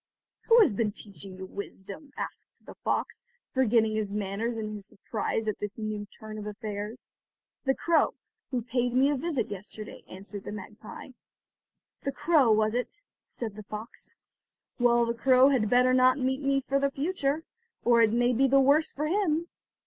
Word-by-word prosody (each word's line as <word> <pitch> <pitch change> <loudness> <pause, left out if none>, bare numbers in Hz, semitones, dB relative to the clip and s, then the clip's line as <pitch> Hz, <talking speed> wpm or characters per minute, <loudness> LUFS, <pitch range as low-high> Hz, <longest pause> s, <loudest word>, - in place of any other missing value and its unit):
"Who 470 0 +7
has 375 - +4
been 210 0 0
teaching 195 -3 -10
you 190 - -6
wisdom?" 200 +8 -8
asked - - -8
the - - -10
fox, - - -1 0.3
forgetting 230 -4 +3
his 215 -2 -1
manners 210 +3 -2
in 215 -1 -4
his 205 -1 -7
surprise 220 +2 -3
at 215 - -1
this 205 -1 -5
new 215 -2 -4
turn 215 +1 -9
of 210 - -6
affairs. 210 +2 -5 0.6
"The 265 0 +3
crow, 335 -2 +2 0.3
who 250 -4 -2
paid 245 +1 -1
me 270 +3 +4
a - - +1
visit 280 -5 -1
yesterday," 210 +2 -8
answered 200 +1 -8
the - - -6
magpie. 210 +3 -9 0.9
"The 275 - -2
crow 280 -2 +3
was 215 0 +3
it?" 250 +11 -3 0.3
said 225 -4 -5
the 215 - -9
fox, 215 +2 -9 0.6
"well, 240 -1 +4
the 235 - -1
crow 255 +2 +5
had 240 -7 +2
better 250 +2 +4
not 255 +1 +5
meet 265 +1 0
me 275 -1 +2
for 275 +1 0
the 280 0 +2
future, 290 +1 -1 0.4
or 235 -1 +5
it 220 -2 +5
may 240 +2 +2
be 270 +3 +3
the 275 +1 +5
worse 285 +4 +3
for 300 - -1
him." 340 -2 +1
235 Hz, 175 wpm, -28 LUFS, 210-275 Hz, 0.9 s, Who